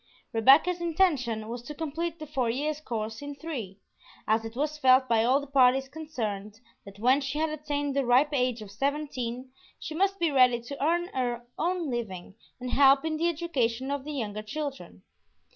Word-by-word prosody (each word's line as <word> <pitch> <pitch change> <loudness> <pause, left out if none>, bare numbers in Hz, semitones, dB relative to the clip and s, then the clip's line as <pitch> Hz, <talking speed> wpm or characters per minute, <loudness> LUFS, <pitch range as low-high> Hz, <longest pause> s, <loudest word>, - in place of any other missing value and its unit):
Rebecca's 280 +10 +5
intention 295 -11 +1
was 235 +1 -5
to 295 +5 -9
complete 325 +2 -3
the 310 - -7
four 270 -5 -1
years' 295 +5 -2
course 220 -3 -4
in 285 0 -6
three, 255 - -6 0.5
as 220 +1 +2
it 225 0 -8
was 300 +3 -2
felt 260 -1 +5
by 225 -2 +3
all 255 +4 +4
the 285 - -7
parties 265 -1 +4
concerned 225 -9 -5 0.3
that 200 0 -12
when 255 +6 +3
she 275 +1 -3
had 315 0 0
attained 290 -2 -3
the 275 - +2
ripe 255 +4 +4
age 250 -4 0
of 200 - -12
seventeen 260 -3 -3 0.3
she - - -6
must 390 +4 +1
be 335 -4 +1
ready 250 -3 +5
to 275 +4 -6
earn 345 +3 +1
her 245 -4 -2
own 345 -3 -1
living 195 -7 -5 0.3
and 250 0 -5
help 275 +1 +5
in 315 -1 -1
the 340 +2 +2
education 270 -7 -1
of 285 -1 -2
the 300 +1 -6
younger 215 -6 -3
children. 280 +5 -6
270 Hz, 185 wpm, -28 LUFS, 235-305 Hz, 0.5 s, Rebecca's